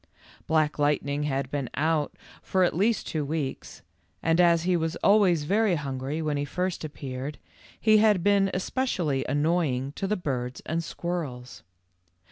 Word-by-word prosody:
Black 155 -2 +1
Lightning 145 0 +1
had 135 -2 -2
been 140 -4 -2
out 155 +1 0 0.3
for 185 -1 +1
at 175 - +1
least 210 +5 +1
two 155 -2 -2
weeks, 145 -2 -4 0.4
and 165 +2 +3
as 170 -2 +4
he 180 0 +2
was 165 -1 -1
always 195 -6 +4
very 205 +3 +2
hungry 140 +1 -3
when 150 -2 -1
he 145 - -1
first 180 +4 -3
appeared, 140 -1 -6 0.4
he 215 -1 +5
had 210 -5 +4
been 200 -1 +4
especially 180 - -1
annoying 145 -3 +1
to 195 +6 -4
the 210 +2 0
birds 130 -7 -3
and 165 +1 -1
squirrels. 150 -7 -5
160 Hz, 150 wpm, -27 LUFS, 145-180 Hz, 0.4 s, he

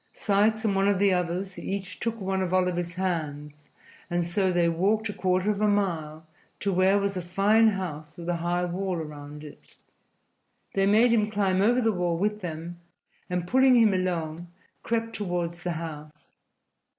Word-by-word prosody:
Sikes 215 +2 +1
and 200 -2 +1
one 195 +1 +2
of 200 -1 +3
the 200 0 +3
others 180 +2 -2
each 195 -1 -5
took 230 -1 -3
one 190 -1 -1
of 185 0 0
Oliver's 175 -2 0
hands, 150 -5 -4 0.4
and 175 -1 0
so 185 +2 +1
they 175 -1 +2
walked 200 +6 +1
a - - -3
quarter 185 +2 +1
of 205 0 -3
a 215 - +3
mile 165 -7 -1 0.3
to 200 -1 -1
where 190 +2 +4
was 200 -1 -1
a 180 - -2
fine 200 +6 +3
house 155 -7 -3
with 170 -1 -8
a 175 -1 0
high 175 +1 -1
wall 185 +1 -2
around 150 -2 -7
it. 150 - -14 1.0
They 195 0 +2
made 225 +4 +5
him 215 -2 +2
climb 195 -3 +1
over 240 +5 +3
the 225 -1 +2
wall 175 -2 0
with 210 +3 -1
them, 170 0 -6 0.5
and, 180 -1 -2
pulling 260 +3 +5
him 225 -4 +5
along, 175 -2 -2 0.3
crept 230 0 -2
toward 175 -5 -2
the 175 0 -4
house. 150 -2 -8
185 Hz, 175 wpm, -26 LUFS, 170-205 Hz, 1.0 s, made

